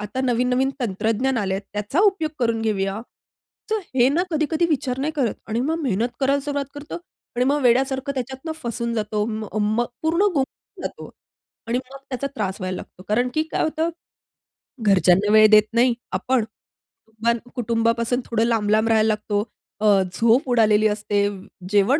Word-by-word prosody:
आता 210 +5 -4
नवीन-नवीन 250 +1 +1
तंत्रज्ञान 225 +4 0
आलंय. 195 -2 -1
त्याचा 210 - -1
उपयोग 325 -5 -4
करून 230 -2 +1
घेऊया. 195 -2 -1 0.7
तर 440 - +2 0.2
हे 245 -1 +5
ना 340 +5 +1
कधी-कधी 315 +2 +1
विचार 260 -5 -1
नाही 295 +3 -1
करत. 255 -7 0
आणि 225 +1 -1
मग 320 +5 -1
मेहनत 230 -4 0
करायला 275 +1 +2
सुरुवात 285 0 -2
करतो. 290 +1 -7 0.4
आणि 250 +1 +2
मग 290 +2 +2
वेड्यासारखं 265 +3 +2
त्याच्यातनं 265 +4 -5
फसून 235 0 -2
जातो. 210 -1 -1
मग 215 -2 -5
मग 215 +3 +1 0.2
पूर्ण 325 +3 +1
गुंफून 270 -4 -4
जातो. - - -6 0.6
आणि 235 - +1
मग 260 +1 -8
त्याचा 260 +1 -2
त्रास 195 -5 -2
व्हायला 185 0 -3
लागतो. 185 - -11
कारण 245 +4 +1
की 310 - +1
काय - - 0
होतं, 315 +1 0 0.9
घरच्यांना 195 0 +4
वेळ 215 0 +8
देत 215 0 +8
नाही 240 +1 +4 0.2
आपण. 255 -4 0 0.8
कुटुंब 235 +1 0
कुटुंबापासून 230 0 +1
थोडं 230 -1 +1
लांब-लांब 220 -1 +2
राहायला 220 -1 +4
लागतो. 210 -1 0 0.4
अ, - - +1 0.3
झोप 230 +6 +3
उडालेली 215 -3 +4
असते. 205 -1 0 0.4
जेवण 205 +8 +3
235 Hz, 160 wpm, -22 LUFS, 215-265 Hz, 0.9 s, वेळ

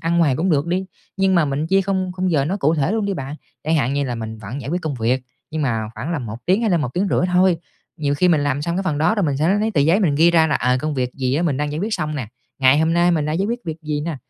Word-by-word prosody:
ăn 170 +1 0
ngoài 150 -6 +3
cũng 180 +6 0
được 145 -1 +2
đi, 180 +2 -1 0.3
nhưng 195 -1 +2
mà 170 -3 +4
mình 145 +2 -2
chia 195 +3 +3
khung 190 -1 -1
khung 185 0 0
giờ 145 -5 +2
nó 180 +7 -1
cụ 160 -4 +2
thể 150 +4 0
luôn 220 -1 0
đi 200 - -1
bạn. 140 -1 -5 0.3
Chẳng 160 +2 +1
hạn 135 -3 +1
như 140 0 0
là 125 -3 -3
mình 110 -1 -6
vẫn 110 +6 -6
giải 140 - -6
quyết 180 +2 -2
công 155 -3 -2
việc, 125 +2 0 0.3
nhưng 155 0 -2
mà 115 -5 -1
khoảng 155 +7 -4
là 165 - -1
1 115 -4 -6
tiếng 190 +4 +3
hay 225 -3 +1
là 175 - +3
1,5 170 +7 0
tiếng - - -4
thôi. 180 -1 +4 0.4
Nhiều 145 -3 0
khi 180 +5 +2
mình 160 -4 +3
làm 145 0 -1
xong 170 +3 -2
cái 195 - 0
phần 155 -6 -1
đó 160 +8 +3
rồi 205 - 0
mình 145 -5 0
sẽ 155 +4 +1
lấy 200 +2 +2
lấy 220 +1 0
tờ 160 - +1
giấy 165 +8 +3
mình 165 -8 +2
ghi 165 +4 +5
ra 165 -2 +4
là, 150 - 0
ờ, 125 +1 +1
công 155 +1 -2
việc 125 -2 -1
gì 130 -1 -1
á 155 - +1
mình 155 -6 0
đang 145 +1 -2
giải 150 - -3
quyết 210 +5 -1
xong 155 0 -3
nè, 130 -7 -4 0.3
ngày 130 +1 +5
hôm 160 +1 +2
nay 175 +1 +3
mình 155 -4 +1
đã 155 - -1
giải 190 +5 0
quyết 235 +2 -2
việc 160 -2 -4
gì 150 -1 -2
nè, 160 0 -3
155 Hz, 330 wpm, -20 LUFS, 140-180 Hz, 0.4 s, ghi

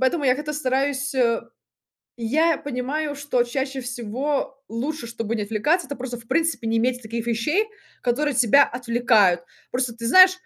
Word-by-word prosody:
Поэтому 275 +3 +1
я 255 - +4
как-то 300 +2 -4
стараюсь. 275 0 -1 1.0
Я 310 +8 +2
понимаю, 285 +3 -3
что 280 -4 +1
чаще 265 +2 -3
всего 255 +4 -3
лучше, 245 +3 -4
чтобы 230 -1 -3
не 210 - -2
отвлекаться, 295 - +1
это 285 - -6
просто 245 -1 -5
в 230 - -16
принципе 325 -7 0
не 225 - +1
иметь 250 +2 0
таких 230 +1 -5
вещей, 300 - +1 0.4
которые 280 +4 0
тебя 250 +4 +6
отвлекают. 230 -7 +2 0.3
Просто 250 -2 -1
ты 230 0 -5
знаешь, 370 +8 +8
255 Hz, 155 wpm, -23 LUFS, 235-290 Hz, 1.0 s, знаешь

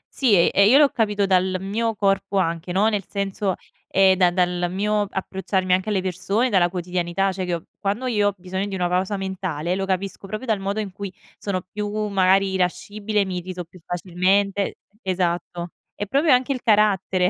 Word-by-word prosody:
Sì 245 -7 +4
e 170 -2 +4
e 200 +1 +5
io 260 - +7
l'ho 290 -1 +6
capito 210 -3 0
dal 185 -1 +2
mio 220 +3 -1
corpo 195 -1 0
anche, 170 -1 -1
no. 195 +4 +3
Nel 205 -3 0
senso, 200 -1 -2 0.3
ehm, 190 0 +4
da 180 -1 +4
dal 180 0 0
mio 205 +2 0
approcciarmi 190 -1 -1
anche 185 +3 +1
alle 195 -3 +1
persone, 195 +7 0
dalla 175 -3 +4
quotidianità, 180 +1 -1
cioè 185 0 -4
che 170 -2 -2 0.2
quando 205 +6 -2
io 210 -5 +2
ho 205 - -1
bisogno 190 +2 -4
di 195 - -4
una 180 -1 0
pausa 185 +3 0
mentale, 180 -4 -3
lo 195 0 -2
capisco 195 +1 -3
proprio 215 +6 -5
dal 220 -4 0
modo 200 +2 -2
in 205 -3 -4
cui 200 +1 -6 0.3
sono 185 -3 -3
più, 205 +3 -5 0.2
magari 195 0 +3
irascibile, 200 +3 -1
mi 185 -1 -4
irrito 180 0 -6
più 175 +2 -17
facilmente 190 +3 0 0.3
esatto. 175 -2 -2 0.2
È 205 - -3
proprio 280 +9 +2
anche 255 +2 +3
il 255 - -6
carattere 195 -4 +3
195 Hz, 185 wpm, -23 LUFS, 180-205 Hz, 0.3 s, io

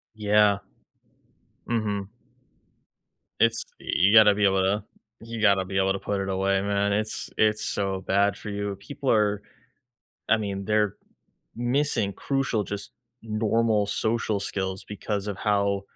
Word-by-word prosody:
Yeah. 105 -1 +3 1.1
Mhm. 105 -4 -1 1.3
It's - - +3 0.2
You 100 +3 +2
gotta 110 -2 +8
be 100 0 +2
able 95 -1 +3
to 100 +2 +1 0.4
You 115 0 -6
gotta 100 -3 +4
be 95 +1 -3
able 95 0 +2
to 100 - -4
put 100 0 -2
it 95 - -3
away, 95 0 +1
man, 100 0 0
it's 110 +3 -2
it's 110 0 +2
so 95 -1 -2
bad 100 +1 +2
for - - -8
you. 100 -1 -3
People 140 +4 -3
are 105 -2 +2 0.9
I 110 - +5
mean, 100 -2 -4
they're 105 -2 +1 0.6
missing 120 -4 0
crucial, 135 -3 -1
just 100 +2 -6 0.3
normal 110 -1 +1
social 110 0 -1
skills 95 -1 -3
because 105 0 -3
of 100 - -3
how 100 -1 +1
100 Hz, 140 wpm, -26 LUFS, 100-110 Hz, 1.3 s, gotta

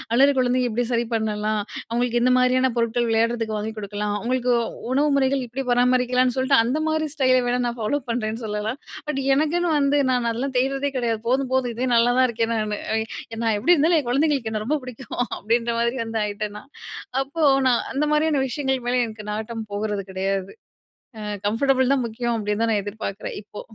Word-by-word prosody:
அழுகிற 275 +2 +5
குழந்தைங்க 250 0 +2
எப்பிடி 240 +2 0
சரி 235 0 +1
பண்ணலாம். 215 -1 -1 0.3
அவுங்களுக்கு 240 0 0
எந்த 250 +1 +4
மாதிரியான 255 0 +3
பொருட்கள் 235 +1 +1
விளையாட்றதுக்கு 225 -1 +1
வாங்கிக் 220 +1 -5
கொடுக்கலாம். 205 0 -3
அவுங்களுக்கு 250 +2 0 0.4
உணவு 290 +3 +3
முறைகள் 270 0 +1
எப்பிடி 265 +3 -5
பராமரிக்கலான்னு 250 0 +3
சொல்ட்டு 260 +1 +3
அந்தமாரி 310 +5 0
ஸ்டைல 255 -3 +4
வேணா, 245 +1 +1
நான் 240 0 -4
ஃபாலோப் 265 +5 -1
பண்ணுறேன்னு 225 0 -3
சொல்லலாம். 215 +4 -3 0.3
பட் 275 -2 -1
எனக்குன்னு 335 +4 +1
வந்து 280 0 +2
நான் 245 -2 +1
அதெல்லாம் 260 +3 -3
தேட்றதே 275 +2 0
கிடையாது. 230 -3 0
போதும், 260 +1 +1
போதும். 255 -2 +1
இதுவே 250 +3 -2
நல்லாதான் 245 +2 +4
இருக்கேன் 230 0 -1
நானு. 215 -2 -1 0.2
அ - - +2 0.5
நான் 225 -1 +2
எப்பிடி 300 +12 +4
இருந்தாலும், 320 +2 +3
என் 270 - -6
குழந்தைங்களுக்கு 275 -4 +1
என்ன 215 -1 -2
ரொம்ப 300 +6 +1
பிடிக்கும் 255 0 -8 0.2
அப்பிடின்ற 235 +2 0
மாதிரி 235 +2 0
வந்து 225 0 -3
ஆயிட்டேன் 210 0 -4
நான். 275 - -18 0.5
அப்போ 290 +4 -3 0.2
நான் 245 -2 +4
அந்த 280 +3 0
மாதிரியான 300 -1 +2
விஷயங்களுக்கு 265 -2 -2
மேல 250 0 +2
எனக்கு 215 -2 -9
நாட்டம் 220 +1 -4
போகிறது 205 0 -2
கிடையாது. 190 0 -2 0.7
அ - - -7 0.3
கம்ஃபர்டபுள் 260 +3 +2
தான் 260 -3 0
முக்கியம் 235 +1 -2
அப்பிடின்தான் 210 +1 0
நான் 205 - +1
எதிர்பார்க்கிறேன் 205 -1 -5
இப்போ. 210 - -10
245 Hz, 175 wpm, -23 LUFS, 220-265 Hz, 0.7 s, அழுகிற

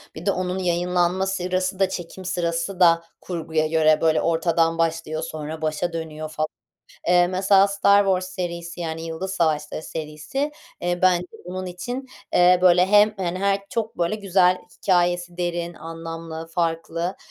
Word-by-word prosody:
bir 160 - -8
de 200 - +3
onun 185 0 -2
yayınlanma 180 +1 +1
sırası 185 0 -1
da 195 - +3
çekim 185 +1 -7
sırası 175 +1 -2
da 170 -1 +5 0.2
kurguya 160 -3 -1
göre, 155 -1 +3
böyle, 160 -1 +3
ortadan 165 0 +1
başlıyor. 165 -1 -1
Sonra 155 0 -6
başa 155 +2 -1
dönüyor 155 -1 -5
falan. 155 0 -2 0.6
Eee, 175 0 +5
mesela, 190 +2 +4
“Star 200 0 +4
Wars” 185 -1 +1
serisi, 170 -1 -5
yani, 160 -1 -4
“Yıldız 165 +4 -4
Savaşları” 155 -2 0
serisi, 160 - -4 0.3
eee, 175 0 -1
bence 180 -1 +4 0.2
bunun 185 +1 -5
için, 245 +9 -5 0.3
eee, 180 0 +6
böyle 180 0 +6
hem, 210 +1 +5
hani 185 -2 -2
her 200 0 +2
çok, 225 -2 -3
böyle, 170 +4 +1
güzel 185 -3 +3 0.2
hikâyesi 175 -1 +1
derin, 175 -1 -2
anlamlı, 165 0 -7
farklı, 165 +1 -2
175 Hz, 150 wpm, -23 LUFS, 165-185 Hz, 0.6 s, eee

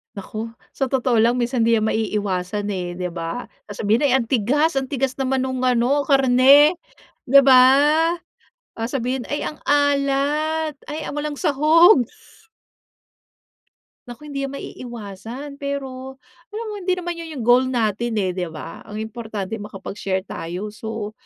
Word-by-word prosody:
Naku, 215 +3 -6 0.2
sa 270 - -2
totoo 255 -3 +1
lang 235 +2 +3
minsan 240 -1 0
'di 230 0 +4
yan 215 - 0
maiiwasan, 205 -2 -2
eh, 180 -2 -4
di 180 0 -3
ba? 170 +7 -4 0.2
Sasabhihin, 215 +6 0
"Ay, 260 - +3
ang 245 -3 0
tigas, 275 +6 +1
ang 265 - -5
tigas 270 -1 -2
naman 265 0 0
nung 260 -1 -3
ano 255 +3 +2
karne" 275 +4 +6 0.5
Di 275 +3 +7
ba? 260 -2 +7 1.2
Sasabihin, 245 +2 -2
"Ay, 290 - -3
ang 305 - -5
alat 290 +2 +1
ay 305 +1 -5
a - - -5
walang 295 0 -3
sahog." 310 - +5 2.0
Naku, 240 +4 -10
hindi 275 -1 -3
yan 275 - -7
maiiwasan 240 +4 -8
pero, 265 -2 -5 0.3
alam 435 +2 -6
mo - - -5
hindi 370 -1 0
naman 350 -1 -5
yun 335 - -7
yung 245 - -4
goal 245 +2 +5
natin, 235 -2 -1
eh, 190 -3 0
di 180 -1 -3
ba? 160 0 -9
Ang 215 +1 -5
importante 220 -2 -6
makapag-share 195 -2 -4
tayo 180 +4 -6
so 215 0 -6
255 Hz, 145 wpm, -21 LUFS, 215-280 Hz, 2.0 s, Di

